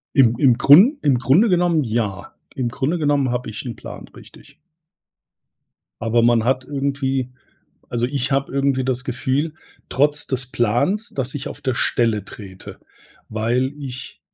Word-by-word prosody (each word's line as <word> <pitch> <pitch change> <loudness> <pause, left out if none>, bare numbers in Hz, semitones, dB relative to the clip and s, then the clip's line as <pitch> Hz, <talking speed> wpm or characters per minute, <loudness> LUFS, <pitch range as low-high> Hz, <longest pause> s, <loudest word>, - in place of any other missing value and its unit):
Im 125 -5 +5
im 125 -5 +4
Grun 195 - +7
im 135 -4 +3
Grunde 170 - +4
genommen 175 -3 +2
ja. 110 -5 -3 0.2
Im 125 -3 -1
Grunde 140 +8 -1
genommen 145 -4 +1
habe 125 +1 -3
ich 105 - -6
'n 120 -3 -6
Plan, - - -10
richtig. - - -16 1.5
Aber 115 +1 +2
man 120 -1 +3
hat 130 +1 0
irgendwie 135 -2 -2 0.6
also, 120 0 -1
ich 140 0 -1
habe 135 0 0
irgendwie 135 -1 +1
das 125 -1 0
Gefühl 135 +5 -2 0.3
trotz 145 +2 +1
des 130 -1 0
Plans, 135 - 0
dass 135 -1 -4
ich 140 -1 -4
auf - - -9
der 130 -2 -1
Stelle 115 -5 +1
trete, 95 -2 -11 0.5
weil 120 +5 -1
ich 130 -3 -8
130 Hz, 150 wpm, -20 LUFS, 120-140 Hz, 1.5 s, Grun